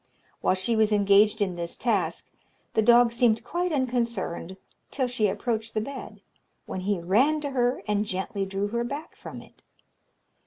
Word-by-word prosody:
While - - +2
she 190 +5 -1
was 220 -1 +3
engaged 205 +1 +4
in 185 -3 -3
this 170 0 -5
task, 195 -9 -1 0.5
the 220 - +3
dog 235 +1 +6
seemed 235 -1 +2
quite 355 +1 -2
unconcerned 235 - -2 0.3
till 265 - -1
she 240 -4 +1
approached 225 +1 -2
the - - +2
bed, 270 +5 -7 0.4
when - - -5
he 195 0 -1
ran 240 - +3
to 285 -1 -3
her, 245 -3 0
and 210 0 +1
gently 195 +1 -3
drew 195 +1 -2
her 235 +2 -1
back 285 +6 -6
from - - -9
it. - - -22
220 Hz, 165 wpm, -26 LUFS, 195-245 Hz, 0.5 s, dog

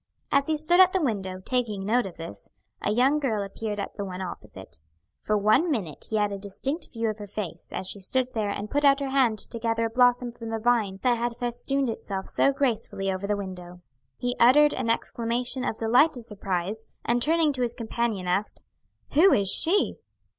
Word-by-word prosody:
As 280 0 +2
he 315 -1 +1
stood 345 +4 +3
at 370 -1 +7
the 380 - +1
window, 190 -7 -2
taking 220 -6 0
note 235 +1 +1
of 180 - -11
this, 100 -12 -9 0.3
a - - -1
young 255 +7 +3
girl 225 -8 -1
appeared 205 +1 -5
at 200 - -5
the 200 - -3
one 185 -2 -6
opposite. 185 - -9 0.4
For 215 - 0
one 215 - +3
minute 190 - -3
he 220 - -2
had 210 -1 +1
a 200 - -5
distinct 265 - -1
view 230 -1 -2
of 215 0 -3
her 205 - -7
face 185 -5 -6
as 190 - -3
she 200 - -4
stood 255 +6 -1
there 215 -2 -1
and 205 +1 -4
put 290 +1 +1
out 275 0 +5
her 275 -1 -3
hand 260 -5 +2
to 230 +3 +1
gather 230 0 0
a 225 - -3
blossom 245 0 +3
from 230 -1 -9
the 225 - -2
vine 220 -4 +1
that 245 -2 +2
had 240 0 -2
festooned 250 +3 -1
itself 195 -4 -4
so 275 - +2
gracefully 235 -8 -1
over 190 +1 -4
the 205 0 0
window. 180 -2 -8 0.4
He 245 0 -2
uttered 295 +5 +6
an 250 -3 -2
exclamation 240 +2 -1
of 220 - -2
delighted 245 +2 +3
surprise, 200 0 -4 0.2
and 240 +1 +1
turning 315 +1 +2
to 255 - -3
his 240 -1 +2
companion 225 -4 -2
asked, 195 +4 -1 0.5
"Who 355 +6 +6
is 200 -5 +2
she?" 390 +5 +3
230 Hz, 205 wpm, -26 LUFS, 200-255 Hz, 0.5 s, at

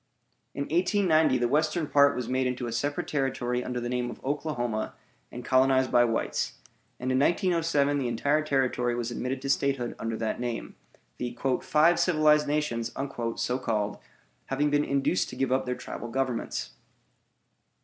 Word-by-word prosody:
In 140 - -1
1890 160 -3 +3
the 120 -1 +1
western 155 +5 +1
part 140 -1 +4
was 125 -2 -3
made 130 +1 +1
into 125 0 -3
a 120 - -4
separate 140 +5 -2
territory 125 -3 -1
under 125 -1 -3
the 120 - -3
name 125 0 -1
of - - -8
Oklahoma 125 -6 -2 0.4
and 125 0 -8
colonized 130 0 +3
by 120 0 +5
whites; 115 -1 -1 0.5
and 130 +1 -2
in 130 - +2
1907 165 -3 +2
the 130 - -1
entire 140 +6 +1
territory 130 -4 0
was 120 0 -3
admitted 130 +2 -3
to 135 - -3
statehood 135 -4 0
under 115 0 -3
that 110 +1 -2
name, 120 -2 -4 0.4
the 120 -1 -4 0.2
"Five 165 +3 +3
Civilized 155 -3 +4
Nations," 145 -6 -1 0.4
so 125 +1 -1
called, 105 -4 -1 0.5
having 145 +2 0
been 145 0 +3
induced 140 +6 +1
to - - -8
give 135 - -1
up 130 0 +1
their 125 - -1
tribal 120 - -7
governments. 125 0 -2
130 Hz, 160 wpm, -28 LUFS, 120-145 Hz, 0.5 s, by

